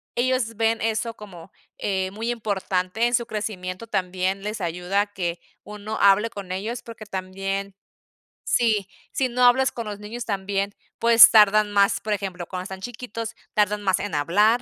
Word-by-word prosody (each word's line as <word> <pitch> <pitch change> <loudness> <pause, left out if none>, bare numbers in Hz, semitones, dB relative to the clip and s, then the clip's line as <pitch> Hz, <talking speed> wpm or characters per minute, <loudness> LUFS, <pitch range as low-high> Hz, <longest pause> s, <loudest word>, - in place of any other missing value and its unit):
ellos 245 -2 0
ven 225 +1 +1
eso 225 +1 -1
como, 190 -4 -12 0.3
eh, 190 -2 -1
muy 225 +3 -4
importante 200 -1 -1
en 240 - -3
su 235 - 0
crecimiento 210 -1 -5
también 185 0 -1
les 210 -1 -4
ayuda 180 +4 0
que 175 -4 -4 0.2
uno 210 +1 -6
hable 200 +3 +5
con 200 -4 -8
ellos 225 +6 -4
porque 230 -2 -10
también 195 0 -4 0.8
Sí 215 -5 +2 0.2
si 260 -2 0
no, 250 +1 0
hablas 260 +2 +5
con 235 -2 -6
los 205 -1 -6
niños 225 +3 -6
también, 200 0 -2 0.2
pues, 230 -1 +8
tardan 210 -1 +5
más 200 -1 +3
por 215 - -1
ejemplo, 185 -4 -4
cuando 180 -1 -5
están 190 0 -8
chiquitos, 230 -1 -6 0.2
tardan 210 0 +1
más 190 -1 +2
en 205 -5 -4
hablar, 210 +11 +3
205 Hz, 165 wpm, -24 LUFS, 190-225 Hz, 0.8 s, pues